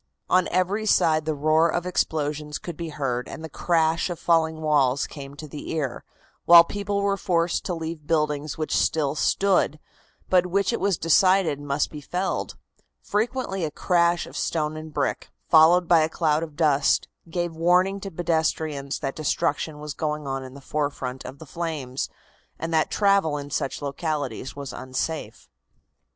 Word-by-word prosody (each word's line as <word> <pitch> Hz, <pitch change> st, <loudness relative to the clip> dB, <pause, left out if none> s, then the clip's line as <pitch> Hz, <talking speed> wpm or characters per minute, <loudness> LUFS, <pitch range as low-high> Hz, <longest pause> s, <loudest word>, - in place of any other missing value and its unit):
On 185 Hz, 0 st, +4 dB
every 190 Hz, +5 st, 0 dB
side 155 Hz, -5 st, +3 dB
the 155 Hz, -1 st, -1 dB
roar 155 Hz, +3 st, +3 dB
of 175 Hz, +2 st, -1 dB
explosions 150 Hz, -4 st, -1 dB
could 175 Hz, -, -7 dB
be 165 Hz, +1 st, -5 dB
heard, 130 Hz, -5 st, -2 dB
and 160 Hz, -, -8 dB
the 160 Hz, -, -6 dB
crash 165 Hz, +2 st, +1 dB
of 175 Hz, -, -4 dB
falling 160 Hz, -1 st, +2 dB
walls 140 Hz, -3 st, +2 dB
came 140 Hz, -1 st, -9 dB
to 155 Hz, +1 st, -9 dB
the 145 Hz, 0 st, -8 dB
ear, 140 Hz, -6 st, -3 dB, 0.4 s
while 170 Hz, 0 st, +10 dB
people 200 Hz, +2 st, -2 dB
were 200 Hz, 0 st, +1 dB
forced 170 Hz, -2 st, 0 dB
to 180 Hz, -, -2 dB
leave 160 Hz, -2 st, -6 dB
buildings 150 Hz, -2 st, 0 dB
which 155 Hz, -1 st, -1 dB
still 150 Hz, -3 st, +1 dB
stood, 180 Hz, -1 st, +1 dB, 0.5 s
but 180 Hz, -1 st, +3 dB
which 200 Hz, +4 st, +1 dB
it -, -, -1 dB
was 195 Hz, -3 st, +1 dB
decided 180 Hz, -1 st, +3 dB
must 145 Hz, 0 st, -1 dB
be 150 Hz, -, -8 dB
felled. 180 Hz, +6 st, -3 dB, 0.5 s
Frequently 215 Hz, -3 st, -1 dB
a 155 Hz, -, 0 dB
crash 170 Hz, +2 st, +1 dB
of -, -, -12 dB
stone 155 Hz, -2 st, -1 dB
and 155 Hz, 0 st, -8 dB
brick, 145 Hz, -2 st, -2 dB, 0.2 s
followed 170 Hz, +2 st, +6 dB
by 170 Hz, -1 st, +6 dB
a 155 Hz, 0 st, +2 dB
cloud 155 Hz, -2 st, +1 dB
of 160 Hz, -3 st, -6 dB
dust, 150 Hz, -3 st, +2 dB, 0.2 s
gave 175 Hz, 0 st, -2 dB
warning 180 Hz, +4 st, +3 dB
to 195 Hz, -, -6 dB
pedestrians 160 Hz, -4 st, -1 dB
that 135 Hz, -2 st, -4 dB
destruction 150 Hz, 0 st, -1 dB
was 150 Hz, -1 st, -6 dB
going 150 Hz, -1 st, -3 dB
on 135 Hz, -1 st, -3 dB
in 130 Hz, 0 st, -10 dB
the 140 Hz, -, -11 dB
forefront 135 Hz, -3 st, -3 dB
of 135 Hz, -, -8 dB
the 160 Hz, -, -11 dB
flames, 150 Hz, -5 st, -4 dB, 0.5 s
and 165 Hz, +1 st, -4 dB
that 155 Hz, -1 st, +2 dB
travel 195 Hz, -7 st, +2 dB
in 145 Hz, 0 st, -7 dB
such 135 Hz, +2 st, -2 dB
localities 140 Hz, -4 st, -3 dB
was 140 Hz, -2 st, -6 dB
unsafe. 130 Hz, +5 st, -4 dB
160 Hz, 170 wpm, -25 LUFS, 145-175 Hz, 0.5 s, while